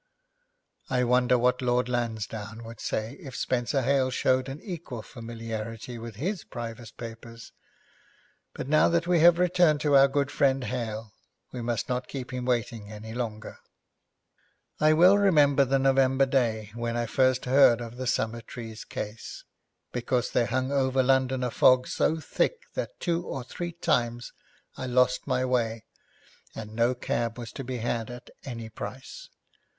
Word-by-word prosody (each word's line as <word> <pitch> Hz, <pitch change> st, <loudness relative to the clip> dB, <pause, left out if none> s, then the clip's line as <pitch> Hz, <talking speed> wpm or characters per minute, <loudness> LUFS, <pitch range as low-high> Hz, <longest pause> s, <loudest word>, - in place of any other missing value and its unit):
I 125 Hz, -1 st, +2 dB
wonder 125 Hz, 0 st, +3 dB
what 125 Hz, +1 st, +2 dB
Lord 125 Hz, 0 st, +1 dB
Lansdowne 110 Hz, -2 st, -3 dB
would 115 Hz, -1 st, -10 dB
say 110 Hz, +1 st, -3 dB
if 135 Hz, -8 st, -9 dB
Spenser 130 Hz, +2 st, 0 dB
Hale 135 Hz, 0 st, +2 dB
showed 130 Hz, 0 st, +1 dB
an 135 Hz, +3 st, -6 dB
equal 160 Hz, -, -6 dB
familiarity 115 Hz, -1 st, -6 dB
with 115 Hz, -1 st, -8 dB
his 175 Hz, -, -3 dB
private 120 Hz, -1 st, -7 dB
papers! 115 Hz, 0 st, -9 dB, 1.0 s
But -, -, -5 dB
now 155 Hz, +2 st, +4 dB
that 170 Hz, 0 st, +1 dB
we 175 Hz, -1 st, +3 dB
have 170 Hz, +1 st, +7 dB
returned 175 Hz, -4 st, +3 dB
to 145 Hz, -2 st, +3 dB
our 135 Hz, 0 st, +8 dB
good 140 Hz, +1 st, 0 dB
friend 135 Hz, -2 st, +2 dB
Hale, 110 Hz, -4 st, -4 dB, 0.4 s
we 125 Hz, -, -5 dB
must 115 Hz, -2 st, -2 dB
not 125 Hz, 0 st, -2 dB
keep 130 Hz, -2 st, -6 dB
him 125 Hz, -1 st, -3 dB
waiting 115 Hz, -4 st, -2 dB
any 110 Hz, +1 st, -8 dB
longer. 110 Hz, -3 st, -5 dB, 1.2 s
I 155 Hz, 0 st, +5 dB
well 180 Hz, +5 st, +6 dB
remember 145 Hz, -8 st, +5 dB
the 135 Hz, +1 st, +2 dB
November 135 Hz, 0 st, +3 dB
day 115 Hz, -6 st, 0 dB
when 115 Hz, 0 st, -3 dB
I 120 Hz, -, 0 dB
first 130 Hz, +2 st, +2 dB
heard 125 Hz, -2 st, +6 dB
of 120 Hz, 0 st, -7 dB
the 130 Hz, 0 st, -4 dB
Summertrees 115 Hz, -1 st, -3 dB
case, 110 Hz, +1 st, -7 dB, 0.5 s
because 125 Hz, 0 st, -1 dB
there 120 Hz, -, +2 dB
hung 130 Hz, +4 st, -1 dB
over 130 Hz, -1 st, +2 dB
London 130 Hz, 0 st, +2 dB
a 125 Hz, -, -1 dB
fog 125 Hz, +1 st, +5 dB
so 160 Hz, -, +1 dB
thick 330 Hz, -, 0 dB, 0.2 s
that -, -, -5 dB
two 170 Hz, -1 st, -1 dB
or 135 Hz, -6 st, -5 dB
three 175 Hz, +7 st, -6 dB
times 120 Hz, -7 st, -1 dB, 0.4 s
I 130 Hz, -, -5 dB
lost 125 Hz, +1 st, +2 dB
my 130 Hz, -1 st, +1 dB
way, 115 Hz, -3 st, 0 dB, 0.7 s
and 110 Hz, -1 st, -7 dB
no 115 Hz, +3 st, +2 dB
cab 115 Hz, -1 st, -2 dB
was 120 Hz, -2 st, -7 dB
to 135 Hz, -, -6 dB
be 130 Hz, 0 st, -4 dB
had 115 Hz, -1 st, -2 dB
at 120 Hz, 0 st, -10 dB
any 115 Hz, -4 st, -6 dB
price. 130 Hz, +4 st, -8 dB
125 Hz, 160 wpm, -27 LUFS, 115-135 Hz, 1.2 s, our